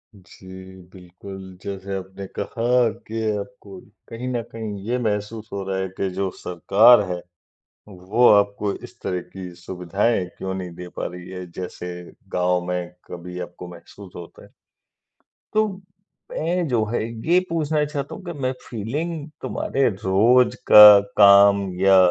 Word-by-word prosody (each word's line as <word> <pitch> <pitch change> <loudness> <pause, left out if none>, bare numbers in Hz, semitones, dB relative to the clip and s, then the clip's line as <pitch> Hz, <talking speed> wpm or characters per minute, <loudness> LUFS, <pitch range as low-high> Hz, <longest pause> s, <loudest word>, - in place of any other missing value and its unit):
जी 95 0 -13 0.2
बिल्कुल, 95 +1 -11
जैसे 100 0 -5
आपने 95 +1 -8
कहा 120 +1 +1 0.2
कि 115 +1 -4 0.2
आपको 100 -3 -9 0.3
कहीं 120 +2 -6
न 120 - -1
कहीं 110 -3 -6
ये 125 - +1
महसूस 105 +1 -3
हो 100 -1 -3
रहा 95 - -1
है 95 0 -2
कि 95 - -1
जो 95 -1 0
सरकार 100 +7 +5
है, 90 -1 -4 0.7
वो 100 +5 +1
आपको 100 0 +2
इस - - -12
तरह 90 -1 -2
की 95 -2 -8
सुविधाएँ 95 +4 -1
क्यों 95 0 -4
नहीं 90 -1 -5
दे 90 +1 -9
पा - - -2
रही 90 0 -9
है, 90 -1 -7
जैसे 90 0 -7 0.4
गाँव 90 0 +2
में 90 -1 -3 0.2
कभी 90 +1 -8
आपको 90 0 -11
महसूस 90 +2 -14
होता 85 -1 -11
है। - - -17 1.1
तो 215 0 +3 0.6
मैं 170 +2 -1
जो 120 -5 +1
है - - 0 0.3
ये 175 +1 +6
पूछना 155 -2 0
चाहता 145 -2 -5
हूँ 200 - -11
कि 170 - -5
मैं 130 - +1 0.2
फीलिंग 145 +8 -4
तुम्हारे 135 -1 -1
रोज़ 110 +6 +3 0.2
का 105 0 +12 0.3
काम 100 0 +7 0.2
या 95 0 +5
100 Hz, 150 wpm, -22 LUFS, 95-120 Hz, 1.1 s, का